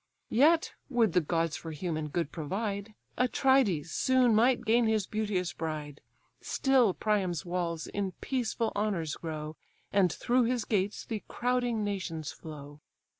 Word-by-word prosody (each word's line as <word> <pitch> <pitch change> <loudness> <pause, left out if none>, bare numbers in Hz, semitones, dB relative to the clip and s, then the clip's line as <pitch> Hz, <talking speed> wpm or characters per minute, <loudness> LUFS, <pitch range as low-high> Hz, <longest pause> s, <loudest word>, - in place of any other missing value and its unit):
Yet, 315 +7 +4 0.2
would 230 -8 +2
the 180 - +4
gods 165 0 0
for 165 - -7
human 155 -1 -3
good 160 +1 -2
provide, 200 +6 -3 0.2
Atrides 250 - +3
soon 255 +1 +3
might 240 +4 +3
gain 230 +1 +4
his 215 -3 +1
beauteous 205 -5 -1
bride, 150 -3 -5 0.4
Still 255 -8 +3
Priam's 195 -5 0
walls 170 -2 -2
in 195 -2 -3
peaceful 235 -2 -2
honours 190 -7 -1
grow, 155 -1 -6 0.4
And 195 -4 +4
through 245 +6 +2
his 240 -2 0
gates 205 -1 -1
the 220 -3 -4
crowding 245 -2 0
nations 185 -7 -3
flow." 145 -2 -10
200 Hz, 135 wpm, -30 LUFS, 165-235 Hz, 0.4 s, Yet